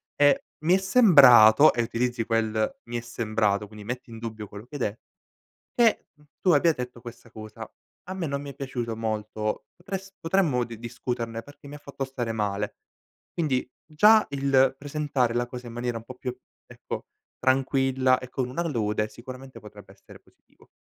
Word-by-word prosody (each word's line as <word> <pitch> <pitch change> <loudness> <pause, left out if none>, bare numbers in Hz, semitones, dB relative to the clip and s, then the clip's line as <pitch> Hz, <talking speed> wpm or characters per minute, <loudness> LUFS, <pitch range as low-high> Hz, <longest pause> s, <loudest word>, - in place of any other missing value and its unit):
eh 145 0 +4 0.2
mi 175 +3 +5
è - - +4
sembrato", 150 - +7
e 120 - 0
utilizzi 120 0 -1
quel, 110 -1 0
mi 120 0 -4
è - - -3
sembrato, 110 -3 -1
quindi 105 0 -12
metti 125 +2 -6
in 115 - -9
dubbio 110 -2 -6
quello 100 +2 -10
che 145 - -11
hai - - -9
de 105 0 -2 0.8
"Che 235 -2 +3 0.4
tu 185 - +4
abbia 165 +2 +5
detto 125 -3 -7
questa 120 0 -11
cosa, 110 -1 -9 0.4
a 185 - -6
me 185 -3 -3
non 140 0 -3
mi 145 - -7
è - - -16
piaciuto 120 -4 -4
molto 110 -1 -3
potres 195 +2 -7
potremmo 165 -8 +1
di 115 -2 -10
discuterne 115 -1 -4
perché 145 +2 -15
mi 145 - -9
ha - - -10
fatto 140 -1 -5
stare 125 -3 -4
male". 105 -1 -2 0.6
Quindi 135 -7 -1 0.2
già 210 +8 +5
il 135 -1 +3
presentare 145 -4 -1
la 120 +1 0
cosa 125 0 -8
in 115 - -9
maniera 120 0 -3
un 115 - -9
po' 130 - -10
più 125 0 -5 0.3
ecco - - -7 0.3
tranquilla 130 -1 +2
e 125 -1 -9
con 125 -1 -3
una 170 +7 -2
lode 105 -6 -1
sicuramente 130 +3 -10
potrebbe 105 -2 -14
essere 100 - -16
positivo. - - -27
125 Hz, 180 wpm, -26 LUFS, 115-140 Hz, 0.8 s, sembrato